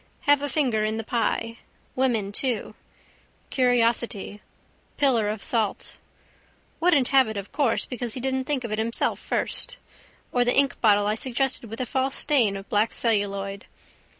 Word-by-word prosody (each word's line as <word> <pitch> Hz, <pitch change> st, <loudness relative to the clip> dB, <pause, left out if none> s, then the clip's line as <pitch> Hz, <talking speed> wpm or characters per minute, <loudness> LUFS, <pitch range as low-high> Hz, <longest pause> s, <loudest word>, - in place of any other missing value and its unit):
Have 290 Hz, -1 st, +4 dB
a 290 Hz, -, -2 dB
finger 250 Hz, -9 st, +1 dB
in 215 Hz, +1 st, -1 dB
the 225 Hz, -, -3 dB
pie. 230 Hz, 0 st, -1 dB, 0.4 s
Women 235 Hz, -6 st, +1 dB
too. 245 Hz, +2 st, -1 dB, 0.8 s
Curiosity. 235 Hz, -5 st, +1 dB, 0.6 s
Pillar 240 Hz, -7 st, +3 dB
of 210 Hz, -1 st, -4 dB
salt. 220 Hz, -4 st, -1 dB, 0.8 s
Wouldn't 320 Hz, -7 st, +3 dB
have 265 Hz, -3 st, +5 dB
it 220 Hz, -1 st, -5 dB
of 200 Hz, 0 st, -6 dB
course 285 Hz, -6 st, +1 dB
because 245 Hz, -3 st, -4 dB
he -, -, -4 dB
didn't 265 Hz, +1 st, -1 dB
think 275 Hz, -3 st, -1 dB
of 235 Hz, -, -5 dB
it 215 Hz, -, -1 dB
himself 230 Hz, +1 st, 0 dB
first. -, -, -2 dB, 0.5 s
Or 245 Hz, -, +3 dB
the 245 Hz, -, +2 dB
inkbottle 220 Hz, -7 st, +3 dB
I 210 Hz, -, +1 dB
suggested 250 Hz, 0 st, -2 dB
with 225 Hz, -, -7 dB
a 255 Hz, -, -1 dB
false 265 Hz, +2 st, -1 dB
stain 235 Hz, -9 st, +2 dB
of 195 Hz, 0 st, -8 dB
black 210 Hz, +1 st, +1 dB
celluloid. 200 Hz, -3 st, -1 dB
235 Hz, 155 wpm, -25 LUFS, 215-265 Hz, 0.8 s, have